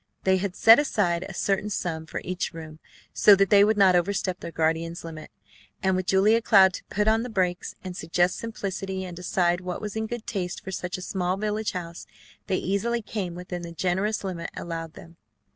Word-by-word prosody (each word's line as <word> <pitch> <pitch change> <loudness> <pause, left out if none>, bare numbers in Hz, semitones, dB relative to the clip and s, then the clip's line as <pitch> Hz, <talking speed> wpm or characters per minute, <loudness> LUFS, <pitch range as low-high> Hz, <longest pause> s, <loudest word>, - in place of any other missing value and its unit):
They 190 0 +3
had 185 -1 -3
set 225 +4 +8
aside 185 -11 0
a - - -7
certain 200 +3 0
sum 160 -5 -3
for - - -5
each 180 0 -3
room 155 -1 -9 0.3
so 205 - +7
that 195 -1 +2
they 200 -1 +7
would 215 +1 +2
not 190 -2 +6
overstep 185 0 0
their - - -7
guardian's 165 +1 -1
limit, 160 -2 -8 0.5
and 190 -1 +2
with 185 0 -2
Julia 210 +4 +4
Cloud 190 -4 +6
to - - -7
put 210 +1 -1
on 220 +1 +4
the 250 - -5
brakes, 180 -4 -1
and 185 -1 -6
suggest 175 +2 0
simplicity, 195 -4 -4
and 180 -1 -8
decide 175 0 0
what 180 -1 -4
was 210 -1 -6
in 220 0 -2
good 240 0 -6
taste 190 -6 -4
for 190 - -6
such 180 -1 -4
a 185 - -8
small 180 0 -1
village 210 +1 -2
house, 170 -2 -7 0.4
they 185 - +1
easily 225 +5 -1
came 190 -6 -4
within 180 0 -6
the 170 -1 -8
generous 190 +5 -1
limit 180 -3 -4
allowed 165 -1 -5
them. 165 0 -14
185 Hz, 205 wpm, -26 LUFS, 175-205 Hz, 0.5 s, set